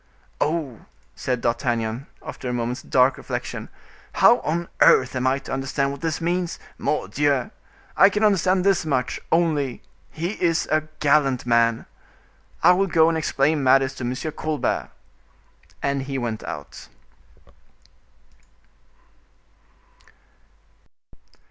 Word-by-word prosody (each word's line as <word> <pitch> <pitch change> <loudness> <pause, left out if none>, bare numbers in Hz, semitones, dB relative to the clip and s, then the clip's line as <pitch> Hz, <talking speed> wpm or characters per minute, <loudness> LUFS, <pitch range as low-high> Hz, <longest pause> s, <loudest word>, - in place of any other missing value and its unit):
"Oh!" 150 -7 -2 0.3
said 125 -2 -2
D'Artagnan, 120 +1 -1 0.2
after 125 - -6
a - - -2
moment's 120 +1 -3
dark 130 -2 +2
reflection. - - -5 0.4
"How - - +5
on 170 +2 -2
earth 130 0 +5
am 130 0 0
I 130 +1 +2
to 135 - -7
understand 135 +1 -1
what 140 - -8
this 160 -2 -2
means? 175 +1 -1 0.2
Mordioux! 135 +5 0 0.4
I 195 - +7
can 210 +2 -1
understand 185 -2 +3
this 195 -1 +2
much, 130 -5 -1
only: 155 -6 +1 0.3
he 175 +6 -5
is 165 -2 +1
a 155 0 +1
gallant 140 -4 +2
man! 115 -1 +2 0.8
I - - +8
will 195 +2 +2
go 165 -2 +4
and 165 - -1
explain 150 0 +1
matters 135 0 +3
to 135 - -8
M. 125 +1 -2 0.2
Colbert." 155 -1 -2 0.9
And 140 0 0
he 135 0 -4
went 115 -4 -3
out. - - -8
140 Hz, 120 wpm, -23 LUFS, 125-165 Hz, 0.9 s, I